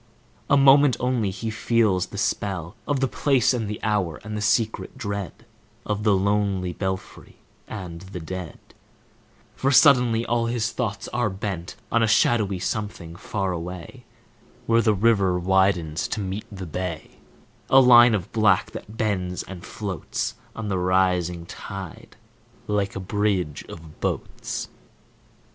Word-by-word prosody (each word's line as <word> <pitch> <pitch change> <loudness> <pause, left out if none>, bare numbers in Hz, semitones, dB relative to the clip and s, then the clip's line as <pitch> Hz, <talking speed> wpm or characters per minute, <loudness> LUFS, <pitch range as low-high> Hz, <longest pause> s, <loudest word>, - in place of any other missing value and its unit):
A 140 - +5
moment 135 -2 +6
only 125 -5 0
he 105 +4 -4
feels 105 -5 +1
the 100 - -9
spell 95 -2 -2
Of 140 -2 0
the 135 - +3
place 130 +2 +2
and 115 -4 -2
the 105 0 -4
hour, 100 -7 0
and 110 0 -6
the 105 - -3
secret 110 +1 0
dread 100 +1 -5 0.4
Of 105 0 -2
the 105 -2 +3
lonely 100 -2 0
belfry 95 0 -5 0.3
and 90 -6 -7
the 95 -1 -8
dead; 90 0 -6 1.0
For 135 - 0
suddenly 125 -5 +5
all 115 0 0
his 115 -1 -1
thoughts 105 -5 -3
are 120 -3 0
bent 95 -3 -5 0.2
On 115 - +3
a 115 - +3
shadowy 105 -2 +3
something 95 -3 -4
far 95 +1 -3
away, 85 0 -7 0.6
Where 115 0 +4
the 110 -2 +3
river 100 -3 +3
widens 90 -3 +1
to - - -3
meet 100 +1 -4
the 95 -2 -7
bay,— 85 -1 -5 0.5
A 135 - +7
line 120 -3 +8
of 95 -1 -4
black 110 -3 +3
that 110 +2 -9
bends 95 -5 -1
and 90 -3 -10
floats 100 -5 -4 0.2
On 110 -1 -5
the 95 -2 -1
rising 90 -2 +1
tide, 95 0 -9 0.5
like 100 -1 -1
a - - -3
bridge 95 -5 -1
of 80 -2 -11
boats. - - -3
100 Hz, 145 wpm, -24 LUFS, 90-115 Hz, 1.0 s, line